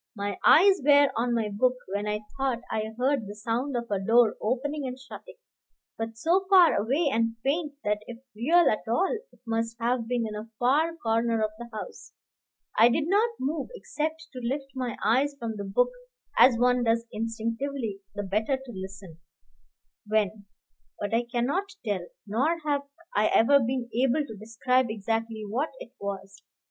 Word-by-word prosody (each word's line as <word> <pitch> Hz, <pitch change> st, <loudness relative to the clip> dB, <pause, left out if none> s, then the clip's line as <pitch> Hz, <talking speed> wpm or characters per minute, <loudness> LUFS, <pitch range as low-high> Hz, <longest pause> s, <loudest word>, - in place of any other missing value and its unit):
My 200 Hz, -2 st, -3 dB
eyes 380 Hz, +1 st, +6 dB
were 285 Hz, 0 st, +6 dB
on 235 Hz, +1 st, +1 dB
my 220 Hz, -2 st, 0 dB
book, 250 Hz, +5 st, +2 dB, 0.2 s
when 205 Hz, +1 st, -1 dB
I 210 Hz, 0 st, -1 dB
thought 265 Hz, -3 st, -1 dB
I 220 Hz, 0 st, -2 dB
heard 255 Hz, -3 st, +1 dB
the 205 Hz, -, -7 dB
sound 240 Hz, +5 st, -2 dB
of 235 Hz, -, -3 dB
a 200 Hz, -, +1 dB
door 225 Hz, +3 st, +4 dB
opening 275 Hz, +5 st, -1 dB
and 255 Hz, 0 st, -5 dB
shutting, 270 Hz, -, -11 dB, 0.6 s
but 225 Hz, 0 st, -5 dB
so 360 Hz, +9 st, +2 dB
far 370 Hz, -4 st, +7 dB
away 270 Hz, +10 st, +1 dB
and 230 Hz, 0 st, +1 dB
faint 295 Hz, +2 st, 0 dB
that 210 Hz, 0 st, 0 dB
if 240 Hz, -, -7 dB, 0.2 s
real 325 Hz, +10 st, +4 dB
at 215 Hz, -, 0 dB
all 365 Hz, -, +1 dB, 0.2 s
it -, -, -23 dB
must 230 Hz, 0 st, -2 dB
have 235 Hz, 0 st, 0 dB
been 240 Hz, -1 st, 0 dB
in 215 Hz, -, -5 dB
a 210 Hz, +2 st, -7 dB
far 300 Hz, +8 st, +2 dB
corner 230 Hz, -4 st, +1 dB
of 215 Hz, -, 0 dB
the 240 Hz, 0 st, -8 dB
house. 345 Hz, -, -8 dB, 0.6 s
I 230 Hz, +2 st, +7 dB
did 295 Hz, +5 st, 0 dB
not 415 Hz, +6 st, +3 dB
move 285 Hz, +3 st, -2 dB
except 315 Hz, -5 st, -4 dB
to 255 Hz, -, -6 dB
lift 270 Hz, +3 st, -3 dB
my 255 Hz, -3 st, -3 dB
eyes 265 Hz, +6 st, +2 dB
from 230 Hz, -4 st, -4 dB
the 200 Hz, -, -4 dB
book 200 Hz, -, +2 dB, 0.4 s
as 250 Hz, -2 st, +6 dB
one 250 Hz, +1 st, +3 dB
does 230 Hz, 0 st, +1 dB
instinctively 230 Hz, +1 st, -3 dB, 0.2 s
the 205 Hz, -, -3 dB
better 215 Hz, +7 st, 0 dB
to 265 Hz, -2 st, -11 dB
listen; 190 Hz, -3 st, -9 dB, 0.9 s
when 210 Hz, -1 st, 0 dB, 0.5 s
But 205 Hz, +1 st, -3 dB
I 235 Hz, +1 st, +2 dB
cannot 335 Hz, +12 st, -1 dB
tell, 190 Hz, -5 st, -2 dB, 0.2 s
nor 260 Hz, +11 st, +1 dB
have 285 Hz, -1 st, 0 dB, 0.3 s
I 210 Hz, +1 st, +4 dB
ever 280 Hz, +5 st, +5 dB
been 250 Hz, -1 st, -1 dB
able 265 Hz, +5 st, +2 dB
to 220 Hz, -, -9 dB
describe 235 Hz, +4 st, +1 dB
exactly 225 Hz, +1 st, -2 dB
what 255 Hz, +10 st, -1 dB
it -, -, -10 dB
was. 195 Hz, 0 st, -6 dB
235 Hz, 175 wpm, -27 LUFS, 220-280 Hz, 0.9 s, far